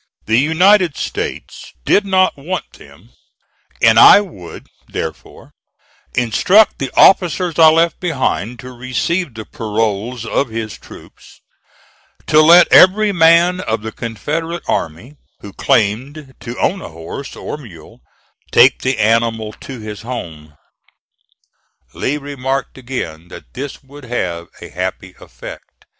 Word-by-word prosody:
The 110 Hz, +2 st, +2 dB
United 175 Hz, +3 st, +3 dB
States -, -, -6 dB
did 200 Hz, 0 st, +2 dB
not 185 Hz, -1 st, +2 dB
want 170 Hz, +7 st, -6 dB
them -, -, -18 dB, 0.7 s
and -, -, +6 dB
I -, -, +9 dB
would, 160 Hz, -, -9 dB, 0.2 s
therefore, -, -, -8 dB, 0.6 s
instruct 180 Hz, -, +3 dB
the 135 Hz, -, -3 dB
officers 180 Hz, -2 st, +3 dB
I 160 Hz, -1 st, +8 dB
left 165 Hz, +1 st, +1 dB
behind 125 Hz, -, -2 dB
to 130 Hz, -, -10 dB
receive 130 Hz, +5 st, -3 dB
the 110 Hz, -1 st, -8 dB
paroles 110 Hz, -1 st, -3 dB
of 125 Hz, +3 st, -1 dB
his 110 Hz, -1 st, -5 dB
troops -, -, -16 dB, 0.8 s
to 155 Hz, -, +4 dB
let 170 Hz, +3 st, +7 dB
every 205 Hz, +3 st, +6 dB
man 170 Hz, +1 st, +4 dB
of 110 Hz, -8 st, -3 dB
the 110 Hz, -, -5 dB
Confederate 155 Hz, +11 st, -5 dB
army 90 Hz, -, -4 dB, 0.2 s
who 100 Hz, -, -11 dB
claimed 130 Hz, +7 st, -1 dB
to 120 Hz, 0 st, -8 dB
own 195 Hz, -, 0 dB
a -, -, -8 dB
horse 85 Hz, -, -9 dB
or -, -, -6 dB
mule 110 Hz, -, -15 dB, 0.5 s
take 125 Hz, +2 st, +5 dB
the 130 Hz, -1 st, -1 dB
animal 110 Hz, 0 st, 0 dB
to 135 Hz, -3 st, -9 dB
his 105 Hz, -2 st, -8 dB
home. 80 Hz, -11 st, -8 dB, 1.4 s
Lee 145 Hz, -, -2 dB
remarked 135 Hz, -2 st, -4 dB
again 120 Hz, -11 st, -6 dB
that -, -, -13 dB
this 140 Hz, +2 st, -7 dB
would 140 Hz, 0 st, -14 dB
have 90 Hz, -8 st, -4 dB, 0.2 s
a -, -, -10 dB
happy -, -, -5 dB
effect. -, -, -13 dB
130 Hz, 130 wpm, -16 LUFS, 110-165 Hz, 1.4 s, I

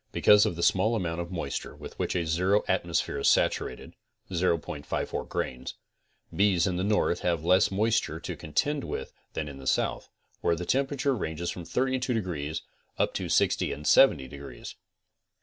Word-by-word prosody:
Because 105 Hz, 0 st, +5 dB
of -, -, -2 dB
the 85 Hz, -, -3 dB
small 105 Hz, +7 st, +3 dB
amount 85 Hz, -5 st, -2 dB
of 85 Hz, -, -6 dB
moisture 80 Hz, -6 st, -4 dB
with -, -, -11 dB
which -, -, -1 dB
a 85 Hz, -2 st, 0 dB
zero 90 Hz, +6 st, +2 dB
atmosphere -, -, 0 dB
is -, -, +3 dB
saturated -, -, 0 dB, 0.4 s
(0.54 85 Hz, -5 st, -2 dB
grains) 65 Hz, 0 st, -4 dB, 0.6 s
bees 100 Hz, -4 st, +3 dB
in 90 Hz, -2 st, -1 dB
the 90 Hz, -, -1 dB
north 100 Hz, -4 st, +1 dB
have 85 Hz, -3 st, -1 dB
less 90 Hz, +3 st, +4 dB
moisture 105 Hz, -5 st, 0 dB
to 85 Hz, +1 st, -5 dB
contend 140 Hz, -, -1 dB
with -, -, -5 dB, 0.2 s
than 80 Hz, -, -3 dB
in 70 Hz, -2 st, -8 dB
the 65 Hz, -, -8 dB
south, -, -, 0 dB, 0.3 s
where 85 Hz, -, +1 dB
the 90 Hz, +2 st, -5 dB
tem 135 Hz, +8 st, +2 dB
perature 140 Hz, -1 st, 0 dB
ranges 85 Hz, -4 st, -3 dB
from 90 Hz, -, -7 dB
32 130 Hz, +6 st, 0 dB
degrees 80 Hz, -8 st, -3 dB, 0.3 s
up -, -, +1 dB
to -, -, -3 dB
60 -, -, +2 dB
and 75 Hz, +2 st, -6 dB
70 75 Hz, -, +5 dB
degrees. 70 Hz, +1 st, -9 dB
90 Hz, 170 wpm, -28 LUFS, 80-105 Hz, 0.6 s, Because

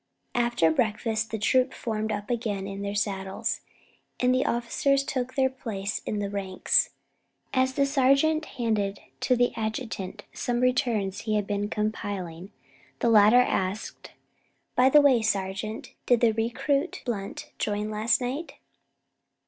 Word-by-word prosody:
After 240 Hz, -9 st, +2 dB
breakfast 220 Hz, +3 st, 0 dB
the 220 Hz, -, -3 dB
troop 255 Hz, +5 st, +2 dB
formed 220 Hz, -1 st, -2 dB
up 205 Hz, +2 st, -3 dB
again 215 Hz, -5 st, -2 dB
in 195 Hz, 0 st, -6 dB
their 200 Hz, 0 st, -3 dB
saddles, 195 Hz, -2 st, -2 dB, 0.6 s
and 250 Hz, 0 st, +3 dB
the 255 Hz, -, +1 dB
officers 255 Hz, +4 st, +1 dB
took 255 Hz, -2 st, -3 dB
their 265 Hz, -1 st, +4 dB
places 215 Hz, -6 st, -4 dB
in 210 Hz, -, -1 dB
the 205 Hz, -1 st, -1 dB
ranks. 190 Hz, -2 st, +1 dB, 0.6 s
As 260 Hz, 0 st, +2 dB
the 280 Hz, -, +3 dB
sergeant 275 Hz, +3 st, +3 dB
handed 210 Hz, -4 st, -1 dB, 0.2 s
to 255 Hz, -, +2 dB
the 245 Hz, 0 st, +2 dB
adjutant 220 Hz, -3 st, -4 dB
some 240 Hz, -1 st, -1 dB
returns 230 Hz, -6 st, +1 dB
he 215 Hz, -1 st, -1 dB
had 210 Hz, -1 st, +1 dB
been 205 Hz, 0 st, -2 dB
compiling, 200 Hz, -5 st, -3 dB, 0.5 s
the 235 Hz, -, +1 dB
latter 220 Hz, +2 st, +7 dB
asked: 195 Hz, -3 st, -2 dB, 0.6 s
"By 255 Hz, +1 st, +5 dB
the 295 Hz, +2 st, +7 dB
way, 265 Hz, -5 st, +5 dB
sergeant, 205 Hz, +1 st, -2 dB
did 245 Hz, -2 st, +4 dB
the 235 Hz, -2 st, +5 dB
recruit 260 Hz, +8 st, -1 dB
Blunt 200 Hz, -5 st, -4 dB
join 210 Hz, 0 st, -1 dB
last 220 Hz, +3 st, +1 dB
night?" 265 Hz, +7 st, -3 dB
220 Hz, 140 wpm, -27 LUFS, 205-250 Hz, 0.6 s, latter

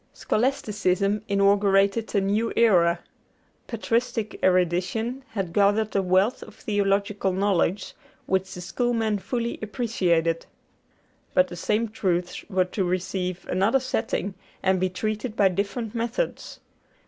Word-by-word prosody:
Scholasticism 210 Hz, -5 st, 0 dB
inaugurated 200 Hz, +2 st, +2 dB
a 200 Hz, -, +4 dB
new 210 Hz, +4 st, 0 dB
era. 175 Hz, -7 st, +4 dB, 0.7 s
Patristic 230 Hz, -1 st, -1 dB
erudition 185 Hz, +8 st, +1 dB
had 190 Hz, -5 st, -3 dB
gathered 205 Hz, +2 st, +2 dB
a 195 Hz, -, +3 dB
wealth 190 Hz, +5 st, +2 dB
of -, -, -11 dB
theological 200 Hz, -1 st, 0 dB
knowledge 190 Hz, 0 st, 0 dB, 0.3 s
which 190 Hz, 0 st, 0 dB
the 180 Hz, -, -7 dB
Schoolmen 220 Hz, +2 st, 0 dB
fully 235 Hz, +3 st, -3 dB
appreciated. 180 Hz, -8 st, 0 dB, 0.9 s
But 185 Hz, 0 st, +4 dB
the 175 Hz, -, -7 dB
same 210 Hz, +6 st, 0 dB
truths 180 Hz, -4 st, -2 dB
were 185 Hz, -2 st, +2 dB
to 190 Hz, +2 st, -2 dB
receive 180 Hz, 0 st, -2 dB
another 200 Hz, +8 st, +2 dB
setting 225 Hz, -6 st, -2 dB, 0.3 s
and 190 Hz, 0 st, +3 dB
be 185 Hz, 0 st, +1 dB
treated 215 Hz, +4 st, -3 dB
by 200 Hz, -3 st, +4 dB
different 205 Hz, +4 st, -3 dB
methods. 235 Hz, -, -3 dB
200 Hz, 120 wpm, -25 LUFS, 185-220 Hz, 0.9 s, a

